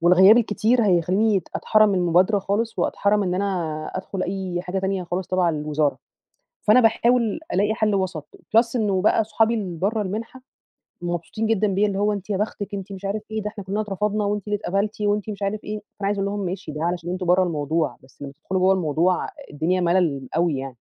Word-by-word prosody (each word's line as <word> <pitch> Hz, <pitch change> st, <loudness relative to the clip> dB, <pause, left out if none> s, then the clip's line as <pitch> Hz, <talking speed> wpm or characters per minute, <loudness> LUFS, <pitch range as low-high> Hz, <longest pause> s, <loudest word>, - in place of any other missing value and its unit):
والغياب 185 Hz, +5 st, +7 dB
الكتير 230 Hz, +2 st, +2 dB
هيخليني 190 Hz, +3 st, +2 dB
أتحرم 215 Hz, -2 st, +3 dB
المبادرة 180 Hz, +3 st, +3 dB
خالص 210 Hz, +4 st, -2 dB
وأتحرم 205 Hz, +1 st, +1 dB
إن 180 Hz, -2 st, -1 dB
أنا 175 Hz, -6 st, -2 dB
أدخل 185 Hz, 0 st, -4 dB
أي 185 Hz, -2 st, -3 dB
حاجة 185 Hz, +1 st, -3 dB
تانية 190 Hz, -1 st, -1 dB
خالص 175 Hz, +1 st, -3 dB
تبع 185 Hz, -1 st, +2 dB
الوزارة، 150 Hz, -2 st, 0 dB, 0.6 s
فأنا 215 Hz, +4 st, +6 dB
باحاول 235 Hz, +2 st, +2 dB
ألاقي 205 Hz, +3 st, +2 dB
حل 215 Hz, -1 st, +1 dB
وسط، 185 Hz, -6 st, -2 dB, 0.3 s
plus 230 Hz, +2 st, +4 dB
إنه 200 Hz, -5 st, +1 dB
بقى 215 Hz, +1 st, +3 dB
صحابي 220 Hz, +2 st, +2 dB
اللي 185 Hz, -7 st, -4 dB
برا 210 Hz, +4 st, 0 dB
المنحة 220 Hz, +6 st, -5 dB, 0.6 s
مبسوطين 175 Hz, +6 st, -3 dB
جدًا 215 Hz, -1 st, +2 dB
بيّا 200 Hz, +1 st, +2 dB
اللي 195 Hz, -1 st, -2 dB
هو 210 Hz, +1 st, +2 dB
أنتِ 200 Hz, 0 st, -6 dB
يا 200 Hz, -, 0 dB
بختِك 205 Hz, 0 st, -3 dB
أنتِ 200 Hz, 0 st, -5 dB
مش 195 Hz, 0 st, -8 dB
عارف 205 Hz, +2 st, -2 dB
ايه 220 Hz, -, -2 dB
ده، 210 Hz, -, -3 dB
إحنا 210 Hz, -1 st, -9 dB
كلنا 200 Hz, +3 st, -2 dB
اترفضنا 210 Hz, +1 st, -1 dB
وأنتِ 205 Hz, -1 st, -2 dB
اللي 210 Hz, -, 0 dB
اتقبلتِ 200 Hz, +3 st, -2 dB
وأنتِ 205 Hz, 0 st, 0 dB
مش 205 Hz, -1 st, -6 dB
عارف 205 Hz, +2 st, -2 dB
إيه، 210 Hz, 0 st, -4 dB
فأنا 205 Hz, -1 st, -7 dB
عايزة 200 Hz, 0 st, 0 dB
أقول 200 Hz, -, -1 dB
لهم 205 Hz, -1 st, -3 dB
ماشي 180 Hz, -2 st, -5 dB
ده 150 Hz, +2 st, -4 dB
علشان 175 Hz, 0 st, -2 dB
أنتم 185 Hz, 0 st, -3 dB
برا 180 Hz, +2 st, +4 dB
الموضوع، 155 Hz, -4 st, -1 dB
بس 130 Hz, -, -22 dB
لما 140 Hz, -1 st, -6 dB
تدخلوا 190 Hz, -1 st, -1 dB
جوا 190 Hz, +1 st, +5 dB
الموضوع 175 Hz, 0 st, +1 dB, 0.2 s
الدنيا 170 Hz, +5 st, 0 dB
ملل 170 Hz, -7 st, +1 dB
أوي 165 Hz, -3 st, +1 dB
يعني. 130 Hz, -2 st, -6 dB
195 Hz, 200 wpm, -23 LUFS, 175-210 Hz, 0.6 s, والغياب